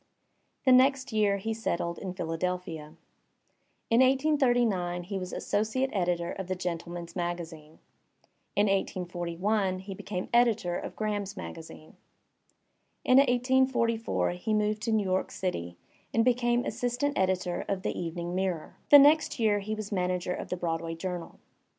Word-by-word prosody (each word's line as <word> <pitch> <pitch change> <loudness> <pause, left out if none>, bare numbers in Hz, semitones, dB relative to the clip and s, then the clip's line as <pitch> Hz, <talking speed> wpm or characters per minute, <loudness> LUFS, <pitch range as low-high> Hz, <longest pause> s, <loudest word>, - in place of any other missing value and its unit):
The 260 - +6
next 260 0 +4
year 205 -2 +3
he 225 +3 -3
settled 170 -6 -2
in 185 -2 -5
Philadelphia. 165 -2 -4 1.0
In 230 - +5
1839 245 - +2
he 195 +2 -4
was 185 -1 -6
associate 220 +6 -1
editor 175 -3 0
of 190 -2 -6
the 185 - -1
Gentleman*s 170 -1 -5
Magazine. 165 -3 -5 0.8
In 205 +1 +4
1841 185 +1 -1
he 190 +1 -7
became 185 -1 -5
editor 225 -7 +3
of - - -5
Graham^s 205 -1 -3
Magazine. 160 -3 -9 1.1
In 255 +1 +6
1844 250 -4 +2
he 195 +5 -2
moved 210 0 0
to 225 - -1
New 215 -1 +2
York 185 -1 0
City 85 - -4 0.3
and 225 0 +2
became 240 -1 +2
assistant 245 +5 -1
editor 185 -2 0
of 190 -1 -2
the - - -2
Evening 170 0 -4
Mirror. 185 -3 -2
The 290 - +11
next 295 +3 +5
year 210 -2 +3
he 215 +2 -3
was 215 -1 -6
manager 180 -2 -1
of - - -6
the 180 - -2
Broadway 165 -1 -2
Journal. 175 0 -5
190 Hz, 140 wpm, -29 LUFS, 175-230 Hz, 1.1 s, The